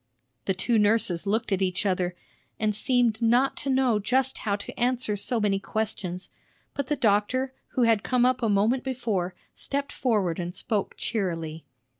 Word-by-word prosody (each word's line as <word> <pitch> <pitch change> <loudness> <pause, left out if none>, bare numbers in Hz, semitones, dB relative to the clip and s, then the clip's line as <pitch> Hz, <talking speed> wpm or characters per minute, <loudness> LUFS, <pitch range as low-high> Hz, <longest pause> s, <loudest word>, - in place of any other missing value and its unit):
The 190 - +1
two 225 +4 +1
nurses 205 -4 +2
looked 220 +2 0
at 195 -1 +1
each 185 +1 0
other, 180 -2 0 0.4
and 215 -1 +1
seemed 240 0 +1
not 240 +4 +3
to 280 - -3
know 260 -5 +3
just 260 +5 +1
how 200 -3 0
to 200 - -8
answer 245 -3 +1
so 215 +4 -1
many 200 -2 +1
questions; 195 -4 -3 0.4
but 280 -2 -3
the 295 - +1
doctor, 255 +3 +1 0.2
who 250 - +2
had 225 -3 +4
come 250 +1 +2
up 255 0 +2
a 225 - +1
moment 215 +6 +2
before, 220 -9 -2 0.2
stepped 280 0 -3
forward 200 -9 0
and 175 +1 -4
spoke 205 +1 -2
cheerily. 165 -7 -3
220 Hz, 170 wpm, -26 LUFS, 195-250 Hz, 0.4 s, had